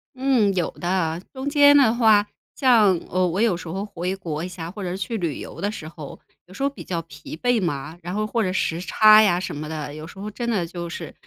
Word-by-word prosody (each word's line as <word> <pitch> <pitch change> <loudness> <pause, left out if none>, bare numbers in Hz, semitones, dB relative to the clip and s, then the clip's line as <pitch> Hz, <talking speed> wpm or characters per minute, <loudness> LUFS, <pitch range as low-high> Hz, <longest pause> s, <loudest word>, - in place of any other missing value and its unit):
嗯， 255 -6 +2
有 175 - 0
的， 175 -2 -2
中 265 0 -5
间 285 0 +6
的 260 -6 +5
话 220 -3 +4 0.3
像， 225 -8 +4
呃， 185 +1 +1
我 180 +4 -1
有 225 -6 +3
时 170 - -9
候 190 +5 -4
回 185 -1 -4
国 165 -5 -5
一 180 - -3
下， 170 -2 -7
或 205 +2 -8
者 180 - -3
是 185 - -4
去 225 +4 -3
旅 170 -7 -2
游 - - -9
的 205 +1 -1
时 155 -7 -8
候， 155 -3 -10 0.3
有 185 - -15
时 240 - -5
候 280 - +2
比 280 - -11
较 170 -2 -3
疲 155 0 -10
惫 245 +2 +1
嘛， 155 -1 -3
然 175 +2 -6
后 215 - 0
或 230 +2 -1
者 185 -4 0
时 170 -2 -1
差 215 +3 +6
呀 180 -5 +3
什 180 - -5
么 150 +1 -6
的， 150 -2 -5
有 155 +1 -8
时 185 - -14
候 210 - -5
真 235 +3 -4
的 195 -7 0
就 170 0 -6
是， 165 -2 -7
185 Hz, 270 characters per minute, -23 LUFS, 165-215 Hz, 0.3 s, 间